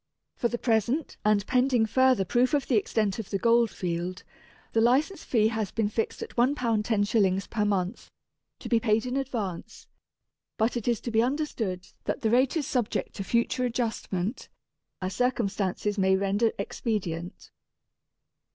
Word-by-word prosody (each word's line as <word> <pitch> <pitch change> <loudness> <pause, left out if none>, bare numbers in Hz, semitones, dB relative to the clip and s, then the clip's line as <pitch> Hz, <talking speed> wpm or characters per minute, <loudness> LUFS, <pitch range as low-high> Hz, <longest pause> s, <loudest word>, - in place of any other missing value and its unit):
For 235 - +1
the 240 - -3
present, 240 +6 0
and 210 -2 +3
pending 250 -2 +3
further 255 -2 +3
proof 250 - +2
of 285 - 0
the 255 - +1
extent 210 -1 0
of 220 - -6
the 200 - 0
Gold 235 +2 +3
field, 180 0 -4 0.5
the 225 - +3
License 285 - +2
fee 220 -3 +2
has 220 -3 -2
been 220 -2 -1
fixed 220 +1 -2
at - - -9
£1 250 +4 +3
10s. 210 -5 +1
per 215 -3 0
month, 195 0 -1 0.5
to - - -8
be 230 - +3
paid 225 0 +1
in 250 +1 -3
advance; 225 -7 -4 0.7
but 220 +3 +1
it 240 -2 -3
is 235 -3 +1
to 235 - -4
be 225 0 +3
understood 235 -9 -2 0.2
that - - -2
the 220 - +1
rate 255 +5 +3
is 300 - -1
subject 245 -5 -1
to 195 - -3
future 235 +4 0
adjustment, 230 -4 -2 0.5
as 185 +1 -2
circumstances 205 -4 0
may 190 0 +4
render 200 +4 +1
expedient. 185 -5 -4
225 Hz, 160 wpm, -27 LUFS, 200-245 Hz, 0.7 s, may